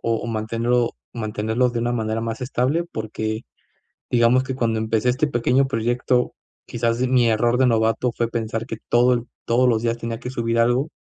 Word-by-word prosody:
o 115 0 -1
mantenerlo 115 +2 0 0.2
mantenerlos 110 +2 -1
de 115 - -2
una 120 - 0
manera 110 -2 -1
más 115 0 -4
estable, 130 +6 0
porque, 110 +1 -3 0.7
digamos 120 +2 +4
que 130 0 -3
cuando 115 -3 0
empecé 110 +2 +1
este 145 +5 +1
pequeño 130 +1 +2
proyecto, 120 +1 0 0.3
quizás 115 0 -1
mi 125 -2 +3
error 120 +2 +2
de 130 - +4
novato 115 +1 +1
fue 115 -1 -1
pensar 115 -1 -3
que 115 - -6
todo 120 +1 +4
el 120 - -2 0.2
todos 125 +2 +2
los 115 -2 +2
días 115 0 0
tenía 115 -1 -5
que 125 - -5
subir 115 -2 -1
algo, 120 +5 +2
115 Hz, 180 wpm, -22 LUFS, 115-125 Hz, 0.7 s, digamos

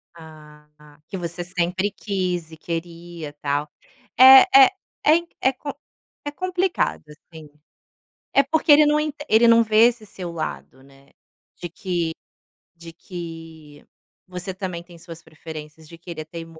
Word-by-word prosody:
Ah 150 -2 -15
tá, 150 -1 -20
que 195 - -6
você 175 0 -5
sempre 180 +2 -1
quis 180 -5 -3
e 160 - -12
queria 170 -2 -7
tal. 145 +1 -2 0.5
É 265 +1 +11 0.2
é 400 - +9 0.4
é 310 +3 +6 0.3
é - - -4
com 285 +1 -7 0.5
é 290 - -3
complicado 365 +2 -2
assim. 155 0 -14 0.8
É 275 - +5
porque 310 +3 +2
ele 300 +1 +7
não 300 +1 +3
enten 295 -1 -5
ele 230 +2 +5
não 230 0 +6
vê 220 +1 +5
esse 235 -3 -6
seu 180 -3 -8
lado, 135 -4 -6
né. 135 0 -21 0.5
De 175 - -5
que 175 -3 -3 0.6
de 170 -1 -12
que, 165 -4 -10 0.4
você 180 +1 -6
também 185 -3 -5
tem 170 -1 -16
suas 165 0 -11
preferências, 155 -1 -11
de 170 - -13
querer 170 -2 -8
até 165 +2 -10
imo 165 -1 -12
170 Hz, 150 wpm, -22 LUFS, 160-215 Hz, 0.8 s, É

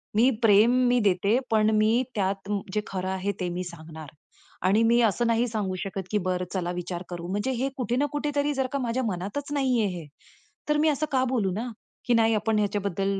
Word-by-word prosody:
मी 235 +5 +5
प्रेम 215 +2 +6 0.2
मी 245 0 +3
देते, 200 +5 +2
पण 215 -1 +4
मी 215 +1 +3 0.2
त्यात 195 0 -2 0.2
जे 210 - +1
खरं 185 -1 -3
आहे 190 +1 -1
ते 180 -2 -1
मी 180 +1 -3
सांगणार. 160 -3 -10 0.6
आणि 205 +4 +4
मी 235 +1 +4
असं 230 +1 +2
नाही 230 +1 +2
सांगू 210 -4 -2
शकत 195 -1 -5
की 210 - +2
बरं 180 0 -1
चला 180 -2 -1
विचार 175 0 -5
करू, 175 -1 -6
म्हणजे 205 +7 -1
हे 270 - 0
कुठे 245 -2 -1
ना 290 - +2
कुठेतरी 290 0 0
जर 265 -2 0
का 280 - 0
माझ्या 250 0 -1
मनातचं 205 +10 -4
नाहीये 255 -6 +2
हे 155 - -10 0.6
तर 300 - +3
मी 310 +1 +3
असं 300 +1 0
का 260 -1 +2
बोलू 235 -7 0
ना? 220 +7 -3 0.4
की 245 - +2
नाही 225 0 +4
आपण 215 0 +1
ह्याच्याबद्दल 200 -1 -1
210 Hz, 205 wpm, -26 LUFS, 190-245 Hz, 0.6 s, प्रेम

